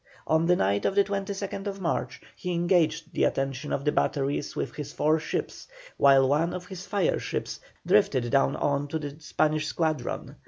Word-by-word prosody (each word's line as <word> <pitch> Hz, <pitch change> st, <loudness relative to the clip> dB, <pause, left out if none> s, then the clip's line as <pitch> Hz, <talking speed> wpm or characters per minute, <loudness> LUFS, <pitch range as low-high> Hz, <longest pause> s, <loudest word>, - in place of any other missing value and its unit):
On 160 Hz, +1 st, +2 dB
the 180 Hz, -, +5 dB
night 100 Hz, -, +1 dB
of 195 Hz, -, +1 dB
the 200 Hz, -, +5 dB
22nd 195 Hz, 0 st, -4 dB
March 170 Hz, -4 st, -2 dB
he 180 Hz, -1 st, -4 dB
engaged 170 Hz, -2 st, +1 dB
the -, -, +1 dB
attention 135 Hz, +1 st, -1 dB
of 140 Hz, -, -2 dB
the 150 Hz, -, +3 dB
batteries 140 Hz, 0 st, -1 dB
with -, -, -3 dB
his 145 Hz, -1 st, -6 dB
four 155 Hz, +2 st, +2 dB
ships -, -, -4 dB, 0.3 s
while 135 Hz, -1 st, +5 dB
one 160 Hz, +6 st, +1 dB
of 180 Hz, 0 st, -6 dB
his 185 Hz, 0 st, -9 dB
fire 195 Hz, -1 st, +1 dB
ships -, -, -4 dB, 0.3 s
drifted 120 Hz, -2 st, +3 dB
down 135 Hz, +1 st, +3 dB
on 145 Hz, -1 st, 0 dB
to 160 Hz, -, -2 dB
the 145 Hz, -2 st, -6 dB
Spanish 155 Hz, 0 st, 0 dB
squadron. 160 Hz, -1 st, -2 dB
155 Hz, 180 wpm, -27 LUFS, 140-180 Hz, 0.3 s, the